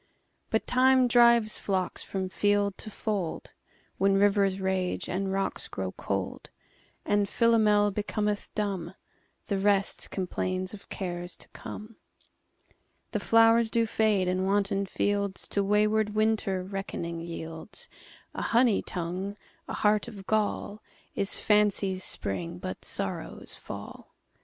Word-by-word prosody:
But 220 - 0
Time 255 0 +4
drives 235 -2 +5
flocks 190 -2 -1
from 190 -1 -3
field 205 +1 +1
to - - -6
fold; 205 -5 -3 0.5
When 195 +1 +4
rivers 195 -1 +3
rage 190 -1 -1
and 190 +1 -2
rocks 195 0 -2
grow 95 -2 -4
cold; 95 -1 -4 0.6
And 205 -1 +2
Philomel 215 -3 +4
becometh 210 0 -2
dumb; 195 -4 -2 0.5
The 200 - -1
rest 200 0 +2
complains 185 0 -2
of 205 - -11
cares 175 -2 -5
to - - -10
come. 215 +1 -9 1.1
The - - -1
flowers 225 0 +5
do 230 0 +2
fade, 215 -4 +2
and 185 +1 0
wanton 200 0 +1
fieldsTo 200 0 -1
wayward 210 +1 +2
Winter 215 -4 +1
reckoning 185 -3 -4
yields:A 165 +3 -8
honey 235 -3 +3
tongue, 185 +3 -4 0.3
a - - -5
heart 210 0 +2
of 200 -5 -9
gall, 210 0 -1 0.3
Is 200 - +1
fancy's 200 -3 +2
spring, 90 -3 -2
but 95 +1 -6
sorrow's - - -4
fall. - - -9
200 Hz, 120 wpm, -28 LUFS, 185-215 Hz, 1.1 s, drives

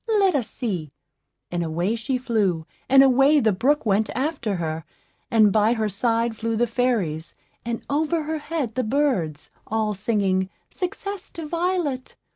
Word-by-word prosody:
Let 390 -2 +4
us 245 -6 -1
see;" 180 - -3 0.6
and 175 -1 -1
away 170 +7 -1
she 235 +3 -1
flew, 205 -10 0 0.2
and 270 +1 +8
away 270 +3 +5
the 220 -5 +3
brook 265 +10 +1
went 210 +1 +2
after 260 -7 -1
her, 160 -2 -3 0.5
and 215 -5 +5
by 215 +2 +4
her 220 -2 0
side 230 +2 0
flew 225 +1 -2
the 240 - +3
fairies, 210 -11 -1 0.3
and 235 0 -4
over 315 +3 0
her 315 +1 -3
head 295 -7 -3
the 255 - 0
birds 215 - 0 0.2
all 215 -1 0
singing, 195 -2 0 0.2
"Success 390 +1 -4
to 330 - -6
Violet!" 335 -5 -1
230 Hz, 155 wpm, -24 LUFS, 200-280 Hz, 0.6 s, and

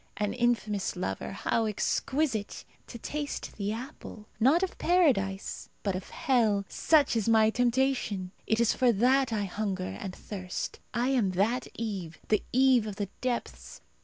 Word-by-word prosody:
An 210 0 -1
infamous 235 -5 0
lover, 185 - -3
how 225 +3 0
exquisite! 230 +2 -1 0.2
To - - -8
taste 290 +5 -5
the 205 0 -1
apple, 230 -2 -8
not 280 +10 +4
of 380 - -2
Paradise, 245 - +1
but 195 -3 0
of 185 - -6
hell 220 -7 +2
such 300 -6 +3
is 225 -1 +1
my 220 -1 +5
temptation. 245 -6 0 0.2
It 220 - +2
is 235 - +3
for 250 -2 +3
that 255 +4 +3
I 215 -2 0
hunger 195 -1 -3
and 190 -2 -6
thirst. 185 -3 -5
I 240 +2 0
am 230 -9 +2
that 225 +7 +1
Eve, 195 -8 -4
the 215 - +3
Eve 255 -3 +4
of 205 - -5
the 200 -1 -3
depths. 250 -2 -4
220 Hz, 155 wpm, -29 LUFS, 200-255 Hz, 0.2 s, my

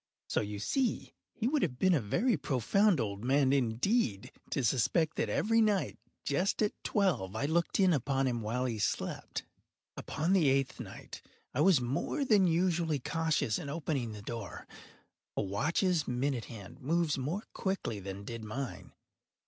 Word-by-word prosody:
So - - +1
you 105 -1 -4
see 250 - -1 0.2
he 230 - -2
would 295 +2 +2
have 125 -8 -1
been 185 +6 +4
a 150 - +3
very 210 - +1
profound 175 - +2
old 100 -2 -3
man, 135 +1 +3
indeed, 125 - +1 0.2
to 140 - -1
suspect 145 +7 +2
that - - 0
every 225 +2 +3
night, 210 -3 +1 0.3
just 180 +9 +1
at 210 - +1
twelve, 180 - +1
I 110 - 0
looked 170 +5 +1
in 190 -2 +5
upon 135 -1 +1
him 120 -3 0
while 120 +4 -1
he 115 -4 -2
slept. 100 - -2 0.5
Upon 165 +5 -1
the 170 -8 +5
eighth 135 0 +1
night - - -9 0.3
I 140 - +1
was 175 -6 +5
more 140 - -1
than 205 -6 +5
usually 170 -2 +2
cautious 160 -5 0
in 140 - -6
opening 140 -6 -2
the 105 -1 -9
door. 115 -4 -6 0.7
A - - +1
watch’s 155 - +1
minute 125 -2 -1
hand 110 +4 -10
moves 155 +1 +1
more 160 - -2
quickly 190 - -2
than 100 +1 -7
did 115 +1 -6
mine. 125 +4 -6
140 Hz, 165 wpm, -32 LUFS, 115-180 Hz, 0.7 s, in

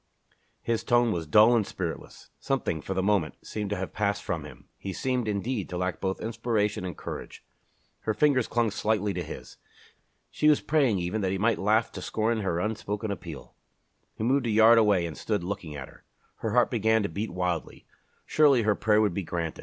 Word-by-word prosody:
His 115 -1 -1
tone 120 -1 +3
was 85 -4 -3
dull 110 +9 +6
and 115 - +3
spiritless. 90 -4 -6
Something, 130 - -1
for 95 - -4
the 95 - 0
moment, 95 -6 +1
seemed 105 -2 -4
to 105 - -1
have 95 0 -5
passed 100 -1 -1
from - - -3
him. - - -13
He 95 - -5
seemed, 125 -1 -1
indeed, 105 +1 -2
to 90 - -4
lack 90 0 -2
both 95 -1 -1
inspiration 110 -3 -1
and 90 -1 -5
courage. - - -7 0.6
Her 110 - -2
fingers 130 -1 +3
clung 120 -2 +1
slightly 105 -1 0
to 90 - -3
his. 80 - -9 0.7
She 150 - +3
was 150 - +5
praying, 140 -9 +2
even, 90 +5 -2
that 95 - 0
he 95 - -1
might 115 +4 +1
laugh 110 +3 +2
to - - -7
scorn 110 +1 0
her 90 -5 -1
unspoken 105 +1 -3
appeal. 80 -9 -8 0.6
He - - -5
moved 130 +1 +2
a - - 0
yard 110 +2 +6
away 100 -5 +3
and 80 -2 -5
stood 105 -5 -2
looking 85 -5 -5
at 65 -3 -6
her. - - -18 0.3
Her - - -3
heart - - +3
began 110 -1 +2
to - - 0
beat 105 +7 -3
wildly. 90 -2 -3 0.4
Surely 140 -6 +4
her 105 0 +3
prayer 105 +1 +2
would 105 -4 +2
be 100 - -2
granted! 85 -2 -4
105 Hz, 200 wpm, -27 LUFS, 95-115 Hz, 0.7 s, dull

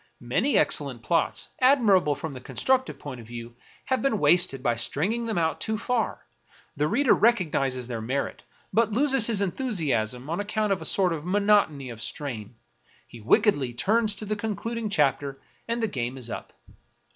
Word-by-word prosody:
Many 180 - +1
excellent 135 -6 +1
plots, 165 -2 0
admirable 215 - +4
from 160 0 -6
the 130 - -9
constructive 260 - 0
point 130 -4 -8
of 110 - -14
view, 120 0 -8 0.3
have 260 - 0
been 270 -5 +1
wasted 175 -9 +3
by 120 -4 +2
stringing 195 - -1
them 220 - -2
out 160 -1 0
too 220 0 -1
far; 230 0 -2 0.5
the 150 +1 +1
reader 275 - +3
recognizes 150 - +1
their 115 -2 -5
merit, 130 +5 -3 0.3
but 225 0 +2
loses 270 0 +2
his 220 -4 +1
enthusiasm 155 - -1
on 170 +4 -2
account 210 0 0
of 190 - -4
a - - -5
sort 185 -3 +2
of 155 -2 -5
monotony 185 -8 +2
of 115 -2 -8
strain; 120 -4 -4 0.5
he 120 - -13
wickedly 140 - +2
turns 215 - +2
to 215 - -4
the 215 +1 -2
concluding 220 +1 -3
chapter, 140 -5 0 0.3
and 230 0 -1
the - - +2
game 125 - -4
is 120 -3 -4
up. - - -7
175 Hz, 170 wpm, -26 LUFS, 130-220 Hz, 0.5 s, admirable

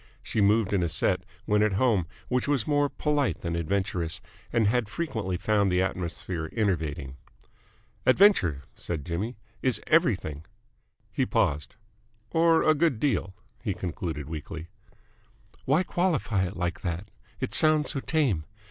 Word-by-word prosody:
She 110 - -1
moved 105 0 +3
in 100 - +2
a 85 - 0
set, - - +2 0.2
when 105 0 +2
at 105 -1 +3
home, 100 -5 +2 0.2
which 125 +1 0
was 140 -6 +1
more 145 -1 +2
polite 145 -3 0
than 85 -1 -2
adventurous, 90 0 -1 0.3
and 115 -2 +2
had 110 0 +1
frequently 110 - -2
found 100 +1 +2
the 90 +1 +3
atmosphere 85 -2 -3
enervating. 80 - -1 0.9
"Adventure," 130 - +5
said 80 -5 -5
Jimmy, 100 +8 -3 0.2
"is 125 -5 +1
everything." 100 - +2 0.7
He - - 0
paused. 75 +1 0 0.6
"Or 165 0 +4
a 155 - +5
good 155 -6 +1
deal," 100 -9 0 0.3
he 105 -6 -2
concluded 80 -5 -4
weakly. 80 +2 -7 1.0
"Why 150 +7 +3
qualify 150 - 0
it 90 - -8
like 85 0 -2
that? 90 +4 -4 0.3
It - - -3
sounds 155 -1 +5
so 140 - -2
tame. 130 - 0
100 Hz, 140 wpm, -27 LUFS, 85-135 Hz, 1.0 s, Adventure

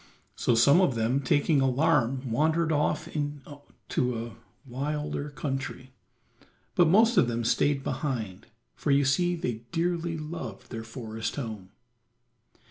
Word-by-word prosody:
So 120 - +1
some 140 +10 +6
of 135 -9 +2
them 115 +4 +1
taking 145 +1 +2
alarm 135 -2 +1
wandered 160 +6 +2
off 150 0 0
into 145 -4 -4
a 115 - -10 0.3
wilder 145 +3 -3
country, 135 -2 -5 0.8
but 175 - +4
most 225 +7 +5
of - - +5
them 120 0 -2
stayed 135 +4 +1
behind, 110 -10 -3 0.3
for - - -4
you 140 0 +4
see 175 +6 +2
they 120 -8 -4
dearly 170 -1 -1
loved 150 -9 -7
their 115 -2 -5
forest 115 -1 -5
home. 110 -9 -6
140 Hz, 125 wpm, -28 LUFS, 120-155 Hz, 0.8 s, some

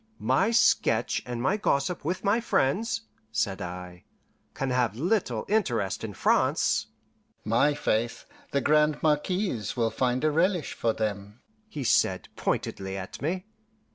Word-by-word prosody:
"My 200 - +2
sketch 120 - +3
and 120 -1 -4
my 195 +9 +2
gossip 155 -2 0
with 175 +5 -2
my 205 +4 +3
friends," 225 - 0 0.3
said 100 -3 -1
I, 90 0 -7 0.5
"can 135 -1 -2
have 125 -4 +1
little 145 - 0
interest 120 - 0
in - - -5
France." - - +2 0.6
"My 120 +7 +3
faith, 115 -5 -1 0.3
the 140 - +1
Grande 150 +1 +3
Marquise 150 - 0
will 115 -1 +1
find 125 +1 0
a 155 - +3
relish 175 +1 +1
for 115 -1 0
them," 105 0 -4 0.3
he 150 -10 -5
said - - +2
pointedly 95 0 -2
at 95 -1 -7
me. 180 +6 -2
135 Hz, 140 wpm, -27 LUFS, 110-175 Hz, 0.6 s, sketch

